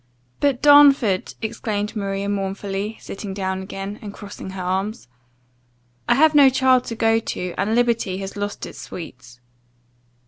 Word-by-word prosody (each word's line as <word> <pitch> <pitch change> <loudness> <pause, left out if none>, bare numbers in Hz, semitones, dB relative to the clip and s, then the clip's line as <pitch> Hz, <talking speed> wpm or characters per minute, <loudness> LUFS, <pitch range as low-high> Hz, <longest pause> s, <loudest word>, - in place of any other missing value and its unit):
"But 275 -3 +1
Darnford!" 280 -9 +5
exclaimed 215 -1 -3
Maria, 200 -1 -2
mournfully 200 +1 -3
sitting 195 -1 -7
down 190 -1 -2
again, 195 +2 -6
and 205 - -7
crossing 200 -2 -9
her 190 -1 -6
arms 190 - -2 1.0
"I - - +5
have 310 +3 +5
no 285 -2 +7
child 260 -1 +3
to 230 - -5
go 225 0 +2
to, 180 -5 -4
and 215 +3 0
liberty 235 -6 +1
has 195 0 -6
lost 205 0 -4
its - - -10
sweets." 125 -8 -10
205 Hz, 145 wpm, -22 LUFS, 195-230 Hz, 1.0 s, no